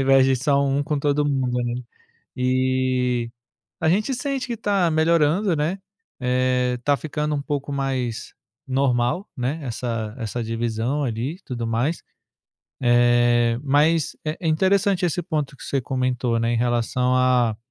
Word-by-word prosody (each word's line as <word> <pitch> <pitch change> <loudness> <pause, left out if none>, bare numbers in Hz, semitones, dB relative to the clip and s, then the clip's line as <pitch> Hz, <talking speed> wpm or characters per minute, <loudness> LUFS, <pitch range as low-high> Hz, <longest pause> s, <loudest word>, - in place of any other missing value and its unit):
invés 135 0 +5
de 135 0 +3
só 140 +2 +2
1 140 +1 +1
com 150 0 -1
todo 145 +1 +1
mundo, 130 -3 0
né? 120 0 -2 0.6
E 130 -1 +1 0.5
a - - +1
gente 215 +8 +1
sente 270 +1 -3
que 235 -2 -4
tá 195 -5 +1
melhorando, 165 +4 +2
né, 160 +6 -1 0.4
eh, 125 -1 +1
tá 145 +2 +2
ficando 150 0 -3
um 140 - -2
pouco 145 -1 -3
mais 130 -4 -2 0.3
normal, 130 - 0
né, 130 +5 -2
essa 115 -3 -4
essa 115 0 -4
divisão 115 +4 -2
ali 120 +2 -2
e 185 - -17
tudo 120 -3 -4
mais. 120 +9 -1 0.8
Eh, 120 -1 +3
mas, 150 +3 +2
eh, 155 +1 -2
é 170 - -4
interessante 190 +3 +2
esse 175 +2 -1
ponto 150 -5 -3
que - - -13
você 135 - -1
comentou, 125 -2 -1
né, 115 +1 0
em 120 - +1
relação 125 +2 +1
a 125 -4 +3
130 Hz, 155 wpm, -23 LUFS, 120-150 Hz, 0.8 s, invés